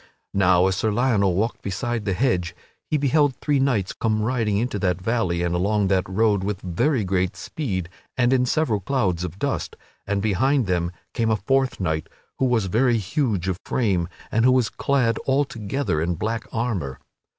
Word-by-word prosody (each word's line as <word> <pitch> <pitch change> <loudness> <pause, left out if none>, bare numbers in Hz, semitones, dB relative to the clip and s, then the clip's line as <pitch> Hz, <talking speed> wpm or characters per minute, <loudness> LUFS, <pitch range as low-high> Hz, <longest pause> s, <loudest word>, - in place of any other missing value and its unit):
Now 90 -2 +4
as 95 0 +1
Sir 110 - +1
Lionel 105 -5 +2
walked 110 +5 -1
beside 115 +3 -3
the 100 - 0
hedge 90 -7 0 0.3
he 155 - +2
beheld 145 -1 +2
three 145 +1 0
knights 125 -9 +1
come 110 -1 0
riding 110 -4 0
into 110 -1 -1
that 90 -2 0
valley 90 -4 0
and 85 0 0
along 100 +3 +1
that 95 -1 +1
road 100 0 +2
with 100 -1 -2
very 110 - +1
great 95 -1 0
speed 95 - -4 0.3
and 120 0 +3
in 125 -1 +2
several 125 -8 +1
clouds 95 -6 0
of 90 0 -5
dust; 140 +6 -2 0.3
and 100 0 0
behind 115 +6 +2
them 90 -2 0 0.2
came 115 -2 0
a 110 - +3
fourth 130 +6 0
knight, 80 -4 -2 0.3
who 135 - +3
was 120 -5 +2
very 120 +5 +2
huge 110 - -1
of 95 -1 -1
frame 95 -9 0 0.2
and 115 - +2
who 130 - +6
was 125 -3 +2
clad 125 -5 +1
altogether 135 - 0
in 85 +1 0
black 115 +5 -2
armor. 100 - -2
110 Hz, 180 wpm, -23 LUFS, 95-125 Hz, 0.3 s, who